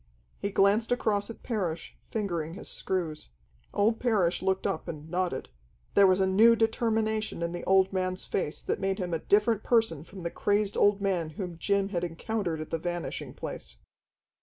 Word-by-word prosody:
He 200 - -1
glanced 205 +4 +3
across 215 -4 +1
at 230 - -10
Parrish, 180 -9 -3
fingering 170 -7 -2
his 210 - -8
screws. 165 - -3 0.4
Old 220 +3 +2
Parrish 195 -8 +2
looked 190 0 0
up 160 - -2
and 155 -1 -6
nodded. 180 -6 -1 0.4
There 200 -1 +7
was 185 0 +4
a 190 - +4
new 220 +5 +6
determination 220 -3 0
in 170 - -1
the 175 - -5
old 190 0 +4
man's 185 0 -1
face 155 -5 -2
that - - -1
made 195 0 0
him 180 -3 -3
a 165 - 0
different 210 +4 +3
person 225 - +2
from 185 +2 -11
the 170 - -2
crazed 205 0 +1
old 205 0 +4
man 180 -5 0
whom 180 -3 -4
Jim 200 0 +1
had 175 -3 -2
encountered 175 0 -2
at 155 - -8
the 165 - -1
Vanishing 175 +1 -4
Place. - - -7
190 Hz, 180 wpm, -29 LUFS, 175-210 Hz, 0.4 s, There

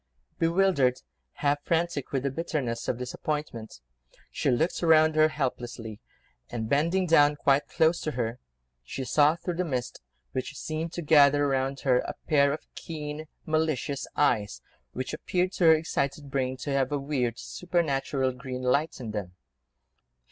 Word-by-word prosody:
Bewildered, 165 -7 +3 0.5
half 145 +1 +2
frantic 165 -4 -1
with 135 -2 -1
the 140 - 0
bitterness 135 -6 -3
of 120 - 0
disappointment, 125 - -5 0.5
she - - 0
looked 160 +8 +1
round 160 -2 +5
her 155 0 +6
helplessly, 120 -7 -4 0.5
and, 110 -2 -3
bending 165 +8 +2
down 150 -3 +5
quite 140 -1 +2
close 160 +2 +2
to 155 - -2
her, 120 0 -2 0.4
she 130 - -5
saw 150 +4 +4
through 170 0 -4
the 180 - +1
mist, 130 -7 -3 0.3
which 130 +2 -4
seemed 160 +1 -4
to 175 - -4
gather 145 -2 +5
round 135 0 -1
her, 125 -2 +3
a - - -4
pair 140 -2 +4
of 150 - -5
keen, 155 -1 -6 0.2
malicious 155 -3 -1
eyes, 110 -8 +1 0.3
which 130 +3 -4
appeared 180 +4 -1
to 180 - 0
her 160 0 +8
excited 145 -2 -2
brain 130 -1 -1
to 140 +3 -4
have 135 -1 +1
a 145 - +1
weird, 135 -5 -1
supernatural 140 -6 -1
green 125 0 -6
light 140 +5 +1
in 115 -4 -5
them. 95 -4 -5
145 Hz, 155 wpm, -27 LUFS, 130-155 Hz, 0.5 s, her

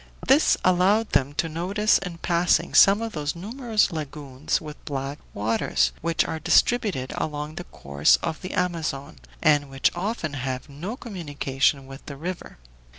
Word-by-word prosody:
This 280 +4 +5
allowed 190 +5 +3
them 140 +1 +1
to 165 - 0
notice 185 +7 +1
in 180 -3 -7
passing 170 +1 +1
some 200 +3 +6
of 225 - -4
those 150 0 -3
numerous 220 +3 0
lagoons 145 -3 -3
with 150 -2 -10
black 140 +1 -4
waters, 110 +2 0
which 165 0 +1
are 160 - -4
distributed 190 - +2
along 150 0 -3
the 175 - -7
course 70 +2 +2
of 160 -2 -3
the 185 - -6
Amazon, 160 - -2 0.3
and 145 -2 +3
which 135 -1 +1
often 175 -4 -3
have 130 -1 -4
no 170 - -6
communication 145 - -1
with 135 +1 -11
the 140 - -7
river. 175 +4 -6
155 Hz, 155 wpm, -24 LUFS, 140-185 Hz, 0.3 s, some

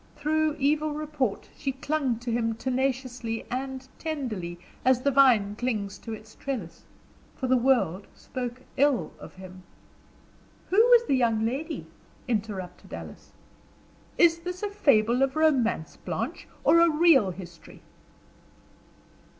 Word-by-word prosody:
Through 310 0 0
evil 300 +2 +1
report 295 -7 -2
she 275 -3 -3
clung 270 -2 -1
to 240 -1 -3
him 230 -1 0
tenaciously 255 -2 -2
and 260 +1 -4
tenderly 230 - -4 0.3
as 255 -1 +3
the 280 - +3
vine 240 -7 +4
clings 210 -5 -3
to 225 - -8
its 215 0 -9
trellis, 235 -12 -6 0.5
for 260 - -4
the 260 0 +3
world 240 -7 +2
spoke 250 0 -6
ill 265 - +2
of - - -11
him." 185 0 -11 1.1
"Who 380 - +1
was 475 +1 +6
the - - +1
young 230 -3 +2
lady?" 295 +8 -3 0.4
interrupted 205 -6 -4
Alice. - - -10 0.9
"Is 335 -1 +5
this 360 +3 -6
a 415 - -2
fable 245 - +3
of 270 +1 +2
romance, 265 - +1
Blanche, - - -4 0.2
or 335 - +6
a 335 0 +6
real 305 - +5
history?" 175 -2 -11
255 Hz, 130 wpm, -27 LUFS, 220-300 Hz, 1.1 s, was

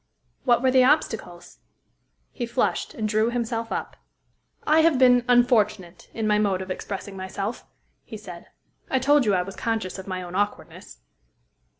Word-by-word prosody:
"What 240 -1 +3
were 260 - +4
the 255 0 +5
obstacles?" 225 - -1 0.7
He 240 - -5
flushed, 240 +2 -1
and 215 -2 -2
drew 215 +1 +1
himself 230 -1 -3
up. - - -4 0.7
"I 310 +1 +4
have 320 -3 +4
been 250 -1 +5
unfortunate 215 -7 +1
in 225 - -4
my 210 0 +2
mode 195 -3 0
of 185 - -7
expressing 195 +1 -6
myself," 195 +4 -5 0.4
he - - -9
said. - - -11 0.4
"I 265 - +1
told 280 +1 +3
you 200 - +3
I 180 - +1
was 195 +1 -9
conscious 220 -5 -3
of 190 - -9
my 185 -1 -4
own 175 0 -9
awkwardness." 205 - -4
220 Hz, 165 wpm, -24 LUFS, 195-245 Hz, 0.7 s, the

